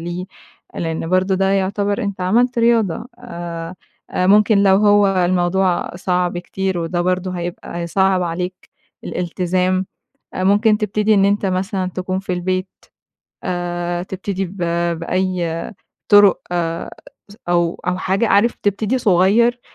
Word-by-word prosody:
ليه. 175 Hz, +2 st, -5 dB, 0.5 s
لإن 165 Hz, -1 st, -3 dB
برضه 185 Hz, +1 st, +2 dB
ده 195 Hz, +1 st, +1 dB
يعتبر 200 Hz, +1 st, 0 dB
أنت 200 Hz, -2 st, -4 dB
عملت 235 Hz, +7 st, +2 dB
رياضة. 230 Hz, -3 st, +2 dB
أ 170 Hz, -7 st, -7 dB, 0.4 s
أ 185 Hz, -, 0 dB
ممكن 210 Hz, +2 st, +5 dB
لو 190 Hz, -1 st, +5 dB
هو 205 Hz, 0 st, +4 dB
الموضوع 180 Hz, -1 st, +1 dB
صعب 180 Hz, -1 st, -1 dB
كتير 190 Hz, +1 st, -3 dB
وده 170 Hz, +1 st, -2 dB
برضه 185 Hz, +1 st, -1 dB
هيبقى 175 Hz, -1 st, -6 dB
هيصعّب 185 Hz, +2 st, +1 dB
عليك 180 Hz, +2 st, -4 dB, 0.3 s
الالتزام. 185 Hz, +1 st, -1 dB, 0.5 s
أ 185 Hz, -, -3 dB
ممكن 210 Hz, +2 st, +4 dB
تبتدي 210 Hz, +1 st, +1 dB
إن 195 Hz, -1 st, +4 dB
أنت 200 Hz, 0 st, +1 dB
مثلًا 185 Hz, 0 st, -1 dB
تكون 185 Hz, 0 st, -2 dB
في 190 Hz, -1 st, -4 dB
البيت 185 Hz, +1 st, -2 dB, 0.8 s
آآ 175 Hz, -1 st, -2 dB
تبتدي 195 Hz, 0 st, -4 dB
ب 190 Hz, +3 st, -12 dB, 0.4 s
بأي 175 Hz, -1 st, -2 dB, 0.4 s
طُرُق 205 Hz, -2 st, +6 dB, 0.9 s
س 205 Hz, -, -14 dB
أو 175 Hz, -1 st, +1 dB
أو 180 Hz, 0 st, 0 dB
حاجة. 195 Hz, +4 st, 0 dB
عارف 215 Hz, +4 st, +3 dB
تبتدي 210 Hz, +5 st, 0 dB
صغير 225 Hz, +3 st, +3 dB
185 Hz, 130 wpm, -19 LUFS, 175-200 Hz, 0.9 s, طُرُق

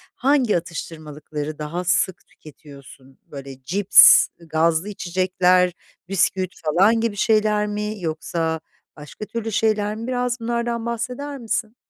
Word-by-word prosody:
hangi 260 Hz, -7 st, +2 dB
atıştırmalıkları 155 Hz, -2 st, -7 dB
daha 165 Hz, +4 st, -4 dB
sık 180 Hz, +1 st, 0 dB
tüketiyorsun? 140 Hz, -3 st, -16 dB
Böyle, 135 Hz, -2 st, -10 dB
cips, 195 Hz, +5 st, +7 dB
gazlı 165 Hz, +3 st, 0 dB
içecekler, 180 Hz, -1 st, +1 dB, 0.4 s
bisküvi 185 Hz, -1 st, 0 dB
falan 195 Hz, +9 st, +3 dB
gibi 230 Hz, -3 st, -1 dB
şeyler 210 Hz, 0 st, +2 dB
mi 210 Hz, +1 st, -4 dB
yoksa 160 Hz, 0 st, -2 dB, 0.4 s
başka 150 Hz, +8 st, -9 dB
türlü 225 Hz, 0 st, -5 dB
şeyler 210 Hz, 0 st, 0 dB
mi? 230 Hz, +2 st, -7 dB
Biraz 250 Hz, -1 st, -1 dB
bunlardan 235 Hz, 0 st, -2 dB
bahseder 250 Hz, +5 st, -4 dB
misin? 230 Hz, 0 st, -3 dB
190 Hz, 115 wpm, -22 LUFS, 160-225 Hz, 0.4 s, cips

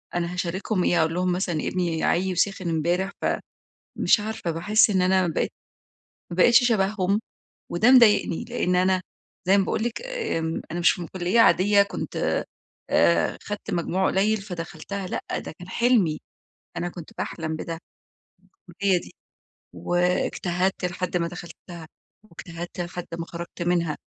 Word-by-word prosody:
أنا 175 Hz, 0 st, -1 dB
هاشاركهم 180 Hz, +2 st, -1 dB
إيه؟ 175 Hz, -, +2 dB
أقول 160 Hz, 0 st, +1 dB
لهم 180 Hz, +1 st, 0 dB
مثلًا 180 Hz, -2 st, -1 dB
ابني 170 Hz, +1 st, -1 dB
عيّي 185 Hz, +2 st, +1 dB
وسِخِن 185 Hz, 0 st, 0 dB
إمبارح، 175 Hz, +4 st, 0 dB
ف -, -, -2 dB, 0.7 s
مش -, -, +4 dB
عارفة 210 Hz, -5 st, -3 dB
باحس 205 Hz, +8 st, +3 dB
إن 190 Hz, -3 st, +2 dB
أنا 185 Hz, 0 st, +3 dB
بقيت 165 Hz, -, -1 dB, 0.8 s
ما 170 Hz, -, -5 dB
بقيتش 235 Hz, +6 st, +6 dB
شبههم، 200 Hz, -1 st, +1 dB, 0.5 s
وده 215 Hz, +9 st, +4 dB
مضايقني، 230 Hz, -6 st, +5 dB
لإن 230 Hz, -7 st, 0 dB
أنا 185 Hz, +1 st, +3 dB, 0.5 s
زي 195 Hz, +2 st, +6 dB
ما 195 Hz, -, +2 dB
باقول 220 Hz, -, -1 dB
لِك 235 Hz, -1 st, -3 dB
آمم، 450 Hz, -, -2 dB
أنا 175 Hz, -, -3 dB
مش 175 Hz, +1 st, +3 dB
من 170 Hz, -, -5 dB
كلية 185 Hz, +6 st, 0 dB
عادية 200 Hz, -2 st, +5 dB
كنت 200 Hz, -, -6 dB
آآ، -, -, 0 dB, 0.4 s
آآ، 85 Hz, 0 st, +3 dB
خدت 205 Hz, 0 st, -6 dB
مجموع 180 Hz, +2 st, 0 dB
قليل 210 Hz, +3 st, +2 dB
فدخلتها 190 Hz, +1 st, -6 dB
لأ، -, -, -4 dB, 0.2 s
ده -, -, -8 dB
كان 180 Hz, -, -10 dB
حلمي، 215 Hz, -8 st, +2 dB, 0.6 s
أنا 175 Hz, -, -2 dB
كنت 170 Hz, -2 st, -10 dB
باحلم 160 Hz, -1 st, -3 dB
بده 165 Hz, +1 st, -5 dB, 0.9 s
بالكلية 185 Hz, +1 st, +1 dB
دي، -, -, -13 dB, 0.6 s
واجتهدت 180 Hz, -, 0 dB
لحد 180 Hz, 0 st, -2 dB
ما 170 Hz, -1 st, 0 dB
دخلتها، 170 Hz, -1 st, -10 dB, 0.4 s
واجتهدت 175 Hz, -2 st, -8 dB
لحد 175 Hz, 0 st, -5 dB
ما 165 Hz, -, -3 dB
خرجت 170 Hz, +1 st, -8 dB
منها. 170 Hz, -3 st, 0 dB
180 Hz, 150 wpm, -25 LUFS, 170-200 Hz, 0.9 s, بقيتش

